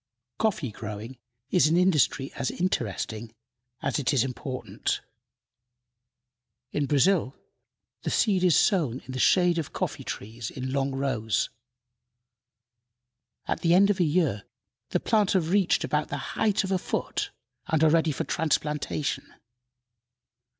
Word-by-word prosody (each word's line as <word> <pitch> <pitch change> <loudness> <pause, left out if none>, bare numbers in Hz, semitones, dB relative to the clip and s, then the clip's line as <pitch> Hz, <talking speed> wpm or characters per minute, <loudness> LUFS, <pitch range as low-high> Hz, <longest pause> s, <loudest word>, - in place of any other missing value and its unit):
Coffee 180 - 0
growing 110 +4 -7 0.3
is 180 -4 +5
an 165 +3 +3
industry 150 -6 +2
as 130 - -2
interesting 115 - -2 0.5
as - - 0
it 135 -1 +1
is 125 - +4
important. 130 0 -3 1.7
In 145 -1 0
Brazil 145 -1 +3 0.7
the - - -2
seed 195 -5 +2
is 180 -4 +5
sown 145 - +2
in 130 - -10
the 130 - -4
shade 175 +3 +4
of 155 - -5
coffee - - -3
trees 110 +2 -6
in 130 0 -5
long 135 -1 0
rows. 120 -6 0 1.9
At - - -2
the 170 0 +4
end 200 +2 +6
of 200 - -2
a - - +5
year 150 - +1 0.5
the - - +1
plants 210 -3 +2
have 175 -3 +1
reached 195 -2 +3
about - - 0
the - - -4 0.2
height 215 -2 +2
of 195 - -3
a 190 - +2
foot, - - -2 0.4
and 160 -1 +2
are 155 - +6
ready 160 -1 +3
for 140 - -2
transplantation. 150 -1 -1
150 Hz, 135 wpm, -27 LUFS, 130-180 Hz, 1.9 s, end